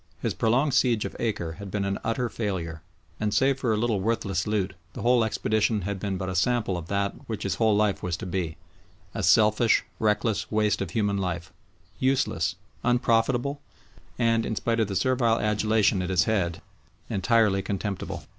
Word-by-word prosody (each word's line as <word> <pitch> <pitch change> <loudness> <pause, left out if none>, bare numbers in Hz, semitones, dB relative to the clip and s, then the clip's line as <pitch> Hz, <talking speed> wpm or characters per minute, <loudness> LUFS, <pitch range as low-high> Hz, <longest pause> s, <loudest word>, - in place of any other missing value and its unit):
His - - -1
prolonged 130 +6 +2
siege 120 -5 +2
of - - -6
Acre 100 -8 -2
had 100 - -6
been 100 +1 -2
an 100 0 -2
utter 115 +2 0
failure, 90 -8 -4 0.4
and 105 -1 0
save 135 +4 +2
for 125 -4 0
a 110 - +1
little 110 -2 +1
worthless 100 -3 -1
loot 100 -2 0 0.2
the - - -6
whole 120 -1 +4
expedition 110 0 0
had 100 +1 -3
been 100 -1 -2
but 95 0 -4
a 95 - -2
sample 105 +1 +1
of 85 -2 -5
that 100 +1 0 0.2
which 110 - -3
his 100 - 0
whole 110 -2 +4
life 105 -1 +1
was 90 -1 -2
to - - -7
be 90 -3 -3 0.6
a - - -3
selfish, 110 +1 +4 0.2
reckless 105 0 0
waste 105 -2 +1
of 95 - -2
human 100 +1 0
life, 85 -3 -3 0.5
useless, 130 -9 +1 0.3
unprofitable, 120 +3 +1 0.6
and, 115 -1 +2
in 110 - -2
spite 115 +2 0
of 110 - +2
the 100 - -4
servile 120 -1 +2
adulation 105 -2 +2
it 90 - -3
has 95 0 +3
had, 95 -7 -1 0.4
entirely 100 0 +2
contemptible. 100 0 -4
105 Hz, 180 wpm, -26 LUFS, 95-115 Hz, 0.6 s, whole